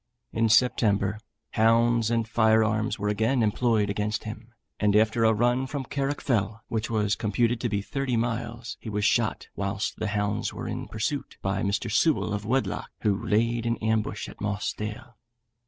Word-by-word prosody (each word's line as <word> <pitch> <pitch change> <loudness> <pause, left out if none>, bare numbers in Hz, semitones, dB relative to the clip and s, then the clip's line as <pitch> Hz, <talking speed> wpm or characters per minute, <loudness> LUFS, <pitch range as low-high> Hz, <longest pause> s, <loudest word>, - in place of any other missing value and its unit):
In 115 0 +2
September, 105 -3 +3 0.3
hounds 115 0 +3
and 115 -1 0
firearms 110 -1 +2
were 105 -1 -2
again 110 +4 +1
employed 110 0 +2
against 105 +1 -2
him, 110 +2 -8 0.3
and 105 -1 +2
after 110 +2 +3
a 110 - +5
run 120 +4 +1
from 140 -1 -4
Carrock 140 +2 -2
Fell, 110 -3 -1
which 110 -1 -2
was 105 -2 +1
computed 115 +2 0
to 120 - 0
be 100 -1 -1
thirty 135 0 -1
miles, 115 0 -3
he 110 - -7
was 105 0 -1
shot 110 +1 +1
whilst 100 0 -2
the 110 - -1
hounds 105 0 -1
were - - -5
in - - -4
pursuit 125 +6 -3
by 95 0 0
Mr. 100 +3 -1
Sewel 105 - +2
of 105 0 -4
Wedlock, 130 +3 -1
who 105 -3 +2
laid 115 +2 +1
in 115 - 0
ambush 110 -1 -1
at - - -12
Moss 105 0 -1
Dale. 110 +3 -7
110 Hz, 170 wpm, -26 LUFS, 105-120 Hz, 0.3 s, a